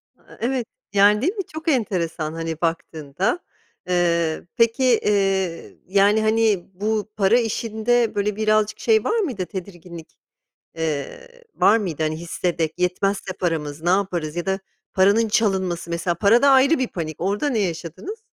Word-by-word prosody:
A - - -32
a, - - -17
evet. 250 0 -1 0.3
Yani, 205 +1 +5
değil 350 +9 +1
mi? 390 - -2
Çok 315 +1 -8
enteresan, 170 - -1
hani, 165 0 -5
baktığında, 165 - -2 0.5
eee, 170 -3 +1
peki, 230 +3 +2
eee, 195 -7 +1
yani, 200 +3 +3
hani, 215 -3 +2
bu 215 +2 -2
para 205 +4 +4
işinde, 230 +1 0
böyle, 205 0 0
birazcık 215 0 +1
şey 220 -2 +3
var 455 - 0
mıydı, 250 - -2
tedirginlik, 175 -3 -9 0.6
eee, 160 - -5
var 215 - +5
mıydı? 170 -8 -3
Hani, 155 0 -1
hissederek, 170 -1 -2
yetmezse 190 +2 -1
paramız, 155 -4 -3
ne 175 - 0
yaparız 175 -5 0
ya 175 - -3
da 190 0 -1 0.3
paranın 200 +4 +4
çalınması, 190 -6 0
mesela 170 +1 -1
para 205 +7 +4
da 280 - +5
ayrı 270 +3 +5
bir 255 - 0
panik, 160 -3 -5
orada 205 - 0
ne 235 - 0
yaşadınız? 185 - -4
195 Hz, 150 wpm, -22 LUFS, 170-225 Hz, 0.6 s, Yani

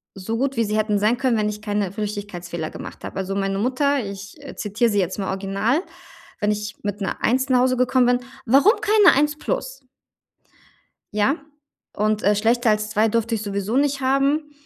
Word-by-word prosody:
so 220 +4 -4
gut, 275 0 -1
wie 230 - +3
sie 210 +1 -1
hätten 210 -1 +1
sein 215 +4 +2
können, 255 -3 +1
wenn 210 0 +1
ich 210 0 -6
keine 205 -3 -1
Flüchtigkeitsfehler 200 -6 -5
gemacht - - -9
habe. - - -7
Also, 195 0 -3
meine 195 0 -1
Mutter 270 +2 +1
ich 200 0 -8 0.2
zitiere 225 +3 0
sie 205 - +1
jetzt 185 -1 -1
mal 195 - -2
original, 195 +7 0 0.6
wenn 210 0 +1
ich 210 0 -4
mit 205 0 -4
'ner 195 - -2
1 260 +3 +2
nach 255 -1 +4
Hause 255 0 +2
gekommen 250 0 +3
bin: 245 0 +3 0.3
„Warum 275 - +5
keine 415 -6 +5
1 295 +1 +2
plus?“ - - -3 1.3
Ja. 215 +9 +2 0.6
Und, 215 0 0
äh, 205 +2 +4
schlechter 230 +3 +2
als 210 0 0
2 215 +1 +2
durfte 230 +1 0
ich 215 - -4
sowieso 200 +2 -2
nicht 280 0 +1
haben. 275 +3 +1
215 Hz, 190 wpm, -22 LUFS, 205-260 Hz, 1.3 s, Warum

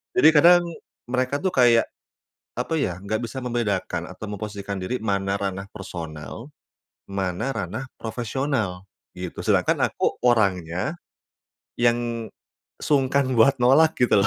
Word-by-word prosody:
Jadi 155 - +7
kadang 175 +4 +7 0.4
mereka 130 +3 0
tuh 190 - +1
kayak, 120 -2 +5 0.7
apa 125 +7 -2
ya? 90 -10 -1
Enggak 110 +2 -2
bisa 130 +3 -6
membedakan 120 -6 -1
atau - - -8
memposisikan 100 -1 -5
diri 110 +8 -3
mana 100 -1 0
ranah 95 0 -3
personal, 85 - -7 0.6
mana 100 +6 -2
ranah 135 0 -4
profesional 115 -4 -2 0.3
gitu. 90 -1 -6
Sedangkan - - +2
aku - - -1
orangnya 100 - +1 0.9
yang 120 -1 +1 0.5
sungkan 140 -2 +2
buat 135 +5 +6
nolak 155 +6 +5
gitu 120 -5 +5
loh. 100 - +3
115 Hz, 120 wpm, -24 LUFS, 100-130 Hz, 0.9 s, Jadi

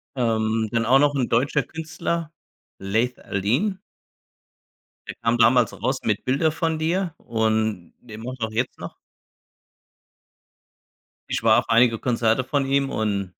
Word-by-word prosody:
Ähm, 110 -2 0
dann 115 -1 0
auch 130 +4 +5
noch 145 0 +3
'n 125 -3 0
deutscher 120 +5 +1
Künstler, 160 0 -4 0.5
Laith 110 +6 -1
Al-Deen. 130 - -1 1.3
Der - - -6
kam 115 0 0
damals 115 0 +4
raus 130 +3 -2
mit 105 -2 -1
„Bilder 140 +5 +2
von 165 0 -1
dir“ 170 +2 -1
und 110 -5 -1
der 110 -3 -11
macht 125 +2 -7
auch 110 0 -2
jetzt 120 +3 -2
noch - - -8 2.3
Ich - - -2
war 115 +1 +5
auf 120 - -6
einige 115 0 +4
Konzerte 115 0 +1
von 140 +1 0
ihm 140 0 +1
und 100 -6 -2
120 Hz, 140 wpm, -23 LUFS, 110-140 Hz, 2.3 s, auch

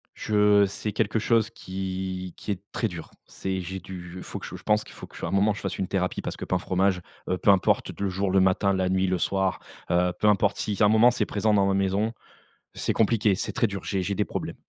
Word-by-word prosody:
Je 105 -1 +4
c'est 105 +2 -4
quelque 110 +1 0
chose 115 0 +2
qui 95 -1 -5
qui - - -4
est 95 -2 -3
très 115 - 0
dur. 85 -5 -8 0.2
C'est 95 -1 -3
j'ai 95 +2 -5
du 90 -1 -9
il 90 - -7
faut - - -6
que - - -8
je - - -7
je 90 - -11
pense 105 0 +2
qu'il - - -14
faut - - -10
qu'à - - -6
un - - -4
moment, 100 +2 +3
je 105 - -8
fasse 95 - -3
une 95 - -2
thérapie. 90 -1 -1
Parce - - -4
que - - -5
pain, 90 - 0
fromage, 95 0 +1 0.3
heu, 90 - +1
peu 100 - +1
importe 95 -2 +3
le 100 -1 0
jour, 95 +1 -1
le 95 - +4
matin, 95 +1 +3
la 95 -1 0
nuit, 95 0 +1
le 95 0 +1
soir, 95 +1 0 0.3
heu, 90 +1 +2
peu 105 - +2
importe, 105 -2 +3
si 105 - -2
à - - +7
un - - +5
moment 110 +3 +6
c'est 120 - 0
présent 105 +1 +1
dans 100 -1 +4
ma 95 - +2
maison, 100 +3 +1 0.6
c'est - - -1
compliqué, 110 -2 +3
c'est 95 - -3
très 115 - +2
dur, 100 -1 -6
j'ai 95 -2 -1
j'ai 100 +2 -2
des - - +1
problèmes. - - -5
95 Hz, 255 wpm, -26 LUFS, 95-105 Hz, 0.6 s, à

